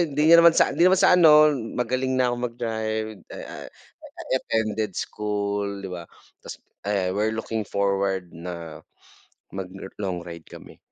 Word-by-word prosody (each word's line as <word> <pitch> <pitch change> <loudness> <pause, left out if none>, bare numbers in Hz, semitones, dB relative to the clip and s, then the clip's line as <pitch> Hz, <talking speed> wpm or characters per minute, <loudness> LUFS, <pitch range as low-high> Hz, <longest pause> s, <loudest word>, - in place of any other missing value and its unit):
hindi 155 0 +2
naman 170 0 +7
sa - - +4
hindi 180 +2 +4
naman 190 - +4
sa - - +6
ano 155 -3 +7 0.2
magaling 130 +2 -1
na 125 -1 +2
akong 120 0 -3
mag-drive, 110 -2 -3 0.3
ah, - - -9 0.3
I - - -12 0.2
attended 110 -3 -2
school, 100 -1 -3
'di 95 - -6
ba 85 -2 -8 0.3
ta's - - -9 0.3
I 95 -3 0
we're 110 +2 -1
looking 110 0 -3
forward 95 -3 -1
na 85 -1 -8 0.7
mag 95 -1 -5
lo 95 0 -9
long 95 -4 -3
ride 85 -2 -10
kami. - - -13
105 Hz, 155 wpm, -24 LUFS, 95-125 Hz, 0.7 s, naman